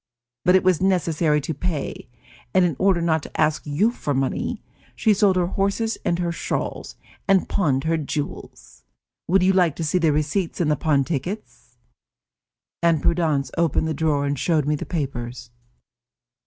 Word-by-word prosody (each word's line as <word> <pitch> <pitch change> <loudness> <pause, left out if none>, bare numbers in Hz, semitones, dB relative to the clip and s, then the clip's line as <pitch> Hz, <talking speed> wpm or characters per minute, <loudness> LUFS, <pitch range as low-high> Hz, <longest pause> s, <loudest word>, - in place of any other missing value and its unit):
But 180 - +5
it 190 - +4
was 185 -2 +2
necessary 165 -5 +2
to 160 - -3
pay, 155 -4 -4 0.5
and 185 - +5
in 165 -5 0
order 190 -3 +3
not 160 -2 +1
to - - -10
ask 155 -1 +2
you 180 +11 +2
for 145 - -3
money, 135 0 -1 0.4
she 220 - +3
sold 200 -2 +3
her 180 -1 +2
horses 200 +5 -1
and 170 - 0
her 175 -1 -1
shawls, 170 - -4 0.3
and 195 -2 +3
pawned 140 -9 +1
her 165 +1 +1
jewels. 150 -1 -6 0.4
Would 185 +2 +3
you 190 +1 +4
like 175 -5 +3
to 165 - -4
see 160 +4 +1
the 165 -3 +3
receipts 155 +5 -1
and 160 -4 +2
the - - +3
pawn 145 -2 +1
tickets?" 175 +9 -6 1.0
And 165 -3 +2
Prudence 160 -5 +1
opened 160 -1 +1
the 160 - -1
drawer 150 -2 0
and 140 -1 -2
showed 160 -5 +1
me 150 - +1
the 150 - -4
papers. 125 -7 -4
165 Hz, 170 wpm, -23 LUFS, 150-185 Hz, 1.0 s, But